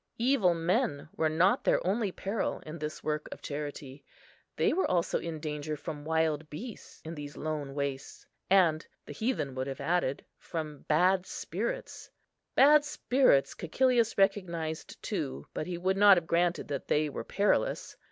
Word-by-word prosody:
Evil 230 -8 +3
men 170 - 0
were 160 - +1
not 170 +5 +3
their - - +2
only 200 +2 +1
peril 195 +3 -2
in 155 +2 -7
this 150 0 -5
work 150 0 -2
of - - -7
charity. 145 -2 -6 0.5
They - - +2
were 375 - +1
also 175 -2 +1
in 165 -2 -5
danger 150 0 -4
from 150 -1 -7
wild 160 -1 0
beasts 220 +9 -9
in 160 - -5
these 145 -2 -8
lone 150 -3 -4
wastes, 140 -1 -4 0.2
and, 175 -5 +4 0.2
the - - -8
heathen 220 - -1
would 130 +1 -3
have 135 -1 -5
added, 145 -2 0
from 155 -4 -6
bad 180 +4 +3
spirits. - - -4 0.5
Bad 295 +2 +7
spirits 255 - +2
Cæcilius 235 +6 +1
recognised 175 -5 0
too; 70 +2 -3
but 155 - -3
he 180 -1 -3
would 190 +2 0
not 200 -1 +8
have 170 - -1
granted 170 +1 +1
that 140 -2 -4
they 150 +1 +2
were 145 - -5
perilous. 205 +1 0
165 Hz, 160 wpm, -30 LUFS, 150-195 Hz, 0.5 s, not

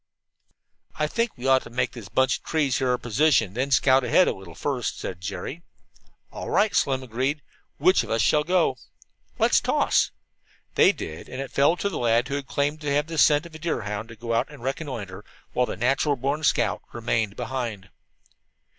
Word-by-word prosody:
"I 155 - 0
think 230 +6 -1
we 125 - -8
ought 130 -1 +5
to - - -11
make 125 +1 -1
this 115 -6 -10
bunch 130 0 +2
of - - -37
trees 145 -5 0
here 130 -1 0
our 125 - +2
position, 125 -2 +2
and 95 - -17
then 130 +3 -1
scout 130 0 +4
ahead 125 +9 +4
a - - +1
little 90 -4 -12
first," 130 +2 -2
said 90 -1 -6
Jerry. 105 - -5 0.7
"All - - -6
right," 210 -2 +2
Slim 135 -1 +1
agreed. 130 +5 -2 0.3
"Which 185 - +4
one - - -9
of - - +1
us 115 - +1
shall 150 -1 +3
go?" 170 -5 +2 0.6
"Let's - - +4
toss." - - +2 0.6
They - - +6
did, 80 0 -8
and 130 - -7
it 135 -1 -5
fell 145 +5 +3
to 200 - -1
the 200 - -3
lad 120 +1 +2
who - - -3
had 140 -1 -3
claimed 145 +2 -1
to 150 - -3
have 145 +1 +2
the 160 -1 -4
scent 150 +2 +5
of 170 - -12
a 160 - -9
deerhound 105 - -3
to 115 - -10
go 115 +1 -4
out 115 - +1
and - - -13
reconnoitre, 120 - -5 0.3
while 125 0 +1
the - - -5
"natural 135 +5 +1
born 140 +4 -2
scout" - - +1
remained 115 -3 -1
behind. 115 -5 -4
130 Hz, 205 wpm, -25 LUFS, 115-150 Hz, 0.7 s, They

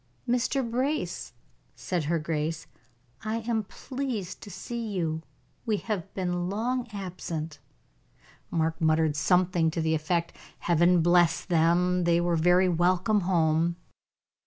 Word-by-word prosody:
"Mr. 250 +1 +1
Brace," 255 - -2 0.4
said 175 -4 -2
her 165 +3 +1
grace, 160 0 -2 0.6
"I 220 +1 -2
am 220 -2 -1
pleased 250 -6 -5
to - - -9
see 230 +5 -5
you. 165 -6 -2 0.4
We 215 -2 0
have 200 -3 -4
been 180 -1 -1
long 240 +5 -1
absent." 170 -6 -5 0.9
Mark 160 0 -1
muttered 155 -1 +3
something 180 +1 +2
to 165 - -3
the 160 0 +1
effect: 170 +2 -1 0.3
"Heaven 175 0 +4
bless 175 -1 +4
them, 175 +1 +2
they 170 0 +4
were 175 0 +1
very 180 +3 +4
welcome 180 +4 +2
home." 170 -2 +2
175 Hz, 125 wpm, -27 LUFS, 165-205 Hz, 0.9 s, Heaven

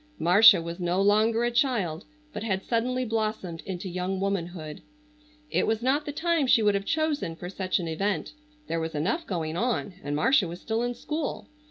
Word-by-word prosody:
Marcia 185 +4 +7
was 170 +2 -6
no 175 +1 0
longer 215 +3 +3
a 240 - +1
child, 230 - 0 0.3
but - - -5
had 195 -3 -1
suddenly 250 +2 0
blossomed 215 -7 -2
into 190 0 -4
young 185 +1 -3
womanhood. 175 -5 -3 0.7
It - - +1
was 220 +1 0
not 285 +4 +1
the - - -2
time 325 -1 +1
she 230 -3 +5
would 205 -1 +4
have 200 0 -1
chosen 310 - -1
for 175 +2 -7
such 185 -1 -1
an 175 -3 -3
event. 195 - -2 0.3
There 165 - -2
was 160 -1 -4
enough 225 - -1
going 165 -4 -3
on, 215 -1 -1
and 145 0 -2
Marcia 195 - +3
was 170 +2 -7
still 225 +3 -2
in 245 0 -2
school. 300 +4 -4
200 Hz, 190 wpm, -27 LUFS, 175-240 Hz, 0.7 s, Marcia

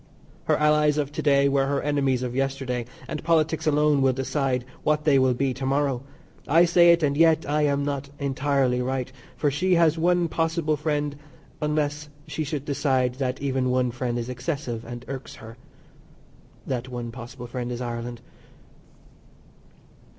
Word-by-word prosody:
Her - - +2
Allies 150 0 +3
of 145 -1 -1
to - - -4
day 140 -1 +4
were 135 -1 +2
her 140 0 0
enemies 135 -3 0
of 125 -1 -4
yesterday, 135 -3 -2 0.2
and 155 -2 -5
politics 160 -1 +1
alone 150 -1 +3
will 135 -1 +3
decide 130 -1 -1 0.2
what 150 0 +1
they 145 -3 +4
will 130 -1 +3
be 135 +1 0
to 135 - -7
morrow. 135 -2 +1 0.5
I 165 +4 +5
say 170 0 +6
it, 170 -1 +3
and 140 -1 +2
yet 160 0 +4
I 150 +1 +2
am 140 0 0
not 140 -1 -3
entirely 135 -2 0
right, 130 0 -2 0.3
for 145 -1 +1
she 180 +6 +2
has 165 -1 +3
one 175 +1 +2
possible 165 -1 0
friend 150 -1 -1 0.5
unless 150 0 -1 0.2
she 155 - -3
should 145 -1 -4
decide 130 -3 +1
that 130 +1 -2
even 130 -2 0
one 125 -1 +1
friend 120 0 -2
is 120 0 -3
excessive 125 -2 -4
and 120 +1 -8
irks 135 -1 -7
her. 115 +1 -11 1.1
That 130 -1 -3
one 120 -2 -5
possible 120 +1 -9
friend 120 0 -4
is 120 - -4
Ireland. 120 -1 -5
140 Hz, 165 wpm, -25 LUFS, 125-150 Hz, 1.1 s, say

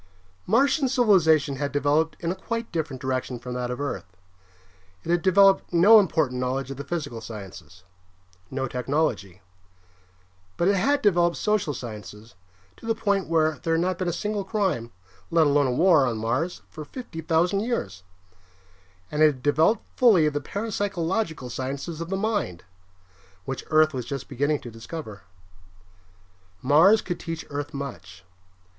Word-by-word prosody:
Martian 270 - +3
civilization 165 - +3
had 140 0 -2
developed 145 +3 +1
in 170 0 -1
a - - -3
quite 230 +4 -5
different 150 -6 -3
direction 130 -1 -3
from 125 +1 -7
that 125 0 -3
of 125 - -4
Earth. 100 -10 -5 0.9
It 170 - -3
had 175 -1 +2
developed 195 +2 +4
no 195 +6 +7
important 155 -10 0
knowledge 130 +2 -2
of 135 - -7
the 140 - -5
physical 145 -9 -4
sciences, 95 -5 -10 0.7
no 135 0 -3
technology. 120 - -2 1.1
But 175 - +2
it 200 - +3
had 280 +9 +1
developed 175 -4 +3
social 210 -7 0
sciences 110 -3 -9 0.4
to - - -11
the 225 - +1
point 200 -3 0
where 155 -2 +1
there 165 0 0
had 165 - +1
not 180 0 -1
been 185 - -1
a - - +1
single 205 +4 -3
crime, 190 - -1 0.4
let 165 -1 +4
alone 145 -1 +3
a - - 0
war, 160 0 +4
on 115 -2 -2
Mars 125 +11 -2
for 155 - -9
fifty 165 - -8
thousand 170 +4 +1
years. 220 - -3 1.1
And 150 - -1
it 155 - +8
had 135 -4 -3
developed 160 +9 +3
fully 205 -11 +5
the 145 0 -3
parapsychological 195 - -3
sciences 140 +6 -5
of 165 - -5
the 195 - -1
mind, 205 - -2 0.8
which 135 - -5
Earth 155 0 +4
was 125 -3 -4
just 135 -2 -5
beginning 145 +3 -1
to 120 - -9
discover. 115 -2 -8 1.4
Mars 165 - +5
could 175 -2 -4
teach 165 -1 -6
Earth 145 0 -4
much. 90 - -8
155 Hz, 155 wpm, -25 LUFS, 130-185 Hz, 1.4 s, it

